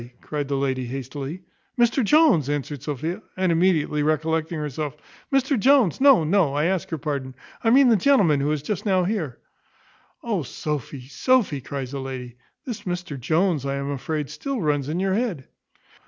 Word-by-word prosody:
cried 145 -2 -4
the 140 0 -1
lady 130 -2 -1
hastily. 135 +6 -6 0.3
"Mr 240 +2 +3
Jones," 275 - +4
answered 145 -1 -3
Sophia; 160 - -4 0.2
and 185 -1 +2
immediately 165 -3 +2
recollecting 160 +2 0
herself, 150 0 -4 0.3
"Mr 270 -1 +2
Jones! 260 - +4
no, 275 - +7
no; 160 -3 +2
I 150 +2 +1
ask 185 0 -1
your 160 - -3
pardon; 140 -3 -4 0.3
I 225 - +3
mean 265 +3 +6
the 230 - +6
gentleman 200 - +4
who 140 - 0
was 150 -1 -1
just 205 +5 -3
now 190 -3 +2
here." 175 - -2 0.9
"O - - -1
Sophy! 145 -3 -5
Sophy!" 210 - +1
cries 130 -1 -5
the 140 - -4
lady; 130 -2 -6 0.3
"this 240 -6 -5
Mr 175 -6 -4
Jones, 160 +3 +1
I 140 0 -2
am 140 0 -3
afraid, 145 +2 -3
still 275 -3 -4
runs 145 -5 0
in 165 +3 -2
your 190 0 +1
head." 200 - -2
155 Hz, 170 wpm, -24 LUFS, 140-195 Hz, 0.9 s, no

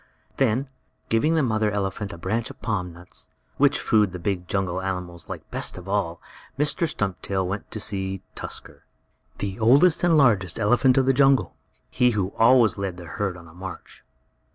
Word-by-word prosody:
Then, 130 +1 +1 0.4
giving 150 +9 +2
the 160 - +2
mother 110 -3 +1
elephant 100 0 -3
a 85 - -8
branch 110 +7 -2
of - - -12
palm 95 -5 -2
nuts, 85 +1 -11 0.3
which - - +3
food 105 -4 +2
the - - -4
big 90 0 -3
jungle 95 -1 -1
animals 90 -3 -5
like - - -7
best - - -1
of 90 0 -10
all, 95 -4 -1 0.4
Mr. 150 +3 +1
Stumptail 95 -2 -2
went 100 +2 -5
to 110 - -6
see 95 -2 -3
Tusker, - - -8 0.5
the 100 0 -4
oldest 140 +11 +5
and 170 -2 +4
largest 105 - +3
elephant 125 +4 +3
of 135 - +4
the 135 - +4
jungle 135 0 +3 0.4
he 125 - +3
who 95 -1 -1
always 115 -2 +5
led 95 -3 -3
the 90 - -9
herd 95 +1 -3
on 85 - -13
the 85 - -15
march. 95 +2 -9
100 Hz, 175 wpm, -24 LUFS, 95-120 Hz, 0.5 s, oldest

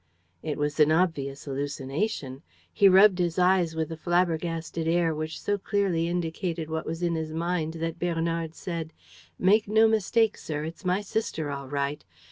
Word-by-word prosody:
It 150 - -3
was 145 +1 -2
an 150 0 +6
obvious 150 -5 0
hallucination. 140 +2 -3 0.3
He 200 - +6
rubbed 190 0 +6
his 175 -1 0
eyes 180 -2 +3
with 160 0 -2
a - - -3
flabbergasted 165 -1 -1
air 165 -1 +2
which 155 +1 -4
so 205 0 -1
clearly 190 -5 0
indicated 170 -1 -3
what 160 0 -3
was 165 +2 -4
in 170 -1 +1
his 160 -1 -3
mind 165 -1 -1
that 165 +1 -4
Bernard 165 -1 -1
said: 165 -3 -5 0.4
"Make 205 +4 +3
no 220 +2 +5
mistake, 220 0 +2
sir. 150 -1 -4
It's 165 +5 -7
my 185 +2 +1
sister 190 -8 -3
all 140 -1 -5
right. 140 +1 -2
165 Hz, 165 wpm, -27 LUFS, 155-180 Hz, 0.4 s, an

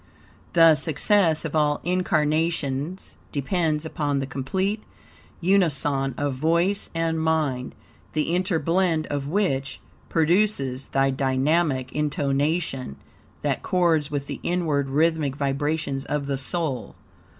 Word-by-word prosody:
The 165 -2 +7
success 165 +2 +2
of 160 - -4
all 150 -1 +2
incarnations 160 -2 0
depends 155 +1 0
upon 145 -3 -1
the 135 - -1
complete 190 +11 -2 0.6
unison 145 -8 +2
of 145 -1 -1
VOICE 170 +8 +1
and 165 -1 0
MIND, 150 -6 0 0.4
the 155 +2 0
interblend 175 -2 +1
of 140 -1 -2
which, 145 -7 -1 0.3
produces 160 -6 +1
the 135 0 +1
dynamic 135 0 +1
intonation, 145 - -1 0.5
that - - 0
chords 165 -5 +1
with 145 -1 -3
the - - -6
inward 155 -6 0
rhythmic 155 -1 +1
vibrations 140 0 -1
of 145 -1 -2
the 140 -1 -2
soul. 140 -4 -2
150 Hz, 110 wpm, -24 LUFS, 140-170 Hz, 0.6 s, The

